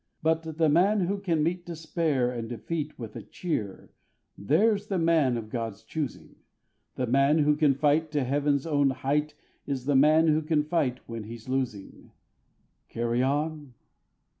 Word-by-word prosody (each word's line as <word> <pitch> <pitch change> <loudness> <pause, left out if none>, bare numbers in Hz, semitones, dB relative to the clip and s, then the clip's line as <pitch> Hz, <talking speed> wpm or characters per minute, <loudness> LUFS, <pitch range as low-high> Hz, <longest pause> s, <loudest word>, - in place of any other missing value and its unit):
But 160 -1 0
the 160 -1 +3
man 190 +7 +3
who 195 +3 -1
can 170 -6 0
meet 175 +2 -1
despair 160 -6 -1
and 115 -2 -5
defeat 150 +6 -4
With 115 -3 -8
a - - -6
cheer, 110 - -5 0.4
there's 200 - +2
the 195 - -1
man 160 -7 +2
of 110 -2 -7
God's 115 -4 -4
choosing; 150 -7 -6 0.6
The 130 - -1
man 140 +5 +3
who 150 -1 +3
can 145 -2 +3
fight 150 +3 +2
to 145 -2 +1
Heaven's 140 +2 0
own 145 -3 +2
height 145 +3 -1 0.3
Is 135 -3 -3
the 145 0 +1
man 155 +4 +5
who 155 +1 +3
can 155 -1 +1
fight 150 -5 -1
when 115 -2 -6
he's 115 +1 -10
losing. 130 -6 -4 0.8
Carry 120 +1 -1
on! 145 0 -2
145 Hz, 160 wpm, -27 LUFS, 125-160 Hz, 0.8 s, man